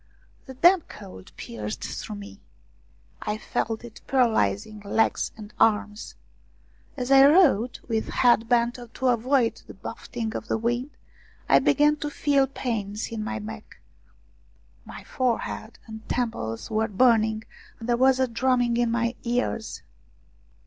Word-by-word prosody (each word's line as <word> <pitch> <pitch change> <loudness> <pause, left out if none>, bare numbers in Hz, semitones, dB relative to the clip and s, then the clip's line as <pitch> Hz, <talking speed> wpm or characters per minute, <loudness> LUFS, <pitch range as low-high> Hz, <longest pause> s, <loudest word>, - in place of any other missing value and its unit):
The 265 - -9
damp 345 +5 +4
cold 190 - -11
pierced 105 -2 -6
through 215 - -5
me. 205 0 -11 0.8
I 210 - -2
felt 220 +1 -3
it 240 -2 -11
paralysing 215 - +1
legs 210 +2 0
and 210 -1 -11
arms. 210 -1 +1 0.8
As 250 0 -3
I 270 0 +8
rode 280 - +4
with 225 -2 -1
head 235 -2 +3
bent 240 0 +2 0.2
to 260 - -1
avoid 245 0 +1
the - - -11
buffeting 225 +2 -6
of 225 - -5
the - - 0
wind, 240 +4 -1 0.6
I - - +6
began 295 0 +3
to 295 0 -4
feel 280 -2 +2
pains 220 -6 -3
in 220 -2 -4
my 235 +2 -3
neck; 215 +1 -9 1.1
my - - -10
forehead 235 -3 -2
and 220 -1 -11
temples 170 - -3
were 220 0 +1
burning, 220 0 +3 0.4
and 225 - -7
there 240 - +3
was 260 +1 +4
a 260 - +3
drumming 245 0 +1
in 240 -1 +2
my 235 +1 0
ears. 235 -2 -2
230 Hz, 140 wpm, -25 LUFS, 215-250 Hz, 1.1 s, I